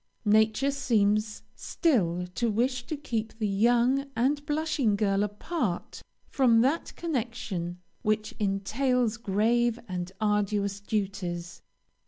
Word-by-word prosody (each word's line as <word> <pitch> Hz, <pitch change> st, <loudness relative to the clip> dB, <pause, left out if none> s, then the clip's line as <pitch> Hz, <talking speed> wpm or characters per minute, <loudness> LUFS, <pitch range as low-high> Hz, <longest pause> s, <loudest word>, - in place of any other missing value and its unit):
Nature 220 Hz, +6 st, +3 dB
seems 215 Hz, -6 st, +1 dB
still 180 Hz, -, +1 dB
to 235 Hz, +4 st, 0 dB
wish 245 Hz, +3 st, 0 dB
to 310 Hz, -, -3 dB
keep 225 Hz, -6 st, -4 dB
the 215 Hz, -2 st, 0 dB
young 240 Hz, +7 st, +2 dB
and 285 Hz, +5 st, +1 dB
blushing 295 Hz, -7 st, +1 dB
girl 200 Hz, -1 st, +1 dB
apart 210 Hz, -, -3 dB, 0.3 s
from 235 Hz, -4 st, +4 dB
that 280 Hz, +7 st, +1 dB
connection 230 Hz, -, -3 dB, 0.2 s
which 215 Hz, 0 st, 0 dB
entails 220 Hz, +4 st, +1 dB
grave 230 Hz, +3 st, +1 dB
and 180 Hz, -1 st, -4 dB
arduous 205 Hz, -1 st, 0 dB
duties. 190 Hz, -4 st, -3 dB
220 Hz, 110 wpm, -28 LUFS, 200-250 Hz, 0.3 s, from